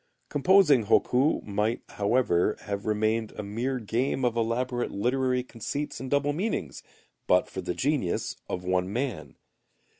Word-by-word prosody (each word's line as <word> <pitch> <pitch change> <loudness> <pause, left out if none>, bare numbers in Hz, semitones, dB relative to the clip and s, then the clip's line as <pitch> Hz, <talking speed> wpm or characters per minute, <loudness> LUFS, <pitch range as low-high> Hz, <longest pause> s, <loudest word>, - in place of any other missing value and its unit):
Composing 150 - +5
hokku 130 +6 +3
might, 105 +3 -1
however, 105 -3 +1
have 100 0 -4
remained 110 +1 0
a 105 - -4
mere 120 +6 -2
game 125 +3 -1
of 120 -1 +1
elaborate 120 +2 -1
literary 125 +4 0
conceits 130 +5 -5
and 130 +1 -6
double 145 +1 +1
meanings, 160 - -3 0.5
but 90 0 +4
for 95 - -6
the 90 -1 -3
genius 135 - -1
of 90 - -3
one 90 +1 0
man. 125 +1 -3
120 Hz, 140 wpm, -27 LUFS, 105-130 Hz, 0.5 s, Composing